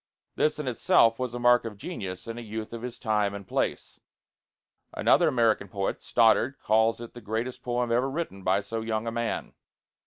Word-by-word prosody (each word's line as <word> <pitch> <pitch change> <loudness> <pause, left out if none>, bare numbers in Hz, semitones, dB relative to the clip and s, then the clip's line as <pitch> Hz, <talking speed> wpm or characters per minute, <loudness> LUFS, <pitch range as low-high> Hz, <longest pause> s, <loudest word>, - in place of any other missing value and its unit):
This 155 0 +1
in 150 -3 -4
itself 115 -1 +3
was 125 -2 -3
a - - -3
mark 120 0 +5
of 110 -3 -7
genius 100 - -6
in 115 +1 -5
a - - -6
youth 110 0 -6
of 115 - -6
his 125 0 -6
time 105 -3 0
and 100 -1 -9
place." - - -2 1.0
Another - - +4
American 115 -4 +2
poet, 100 +1 -3
Stoddard, 115 +4 +3
calls 110 +1 +2
it 120 -1 -9
the 120 - -10
greatest 115 +4 -3
poem 120 -1 -1
ever 125 +3 +2
written 135 - -4
by 95 +2 +2
so 110 +3 -4
young 110 0 -2
a 115 - -2
man. 120 0 -3
115 Hz, 190 wpm, -27 LUFS, 110-120 Hz, 1.0 s, mark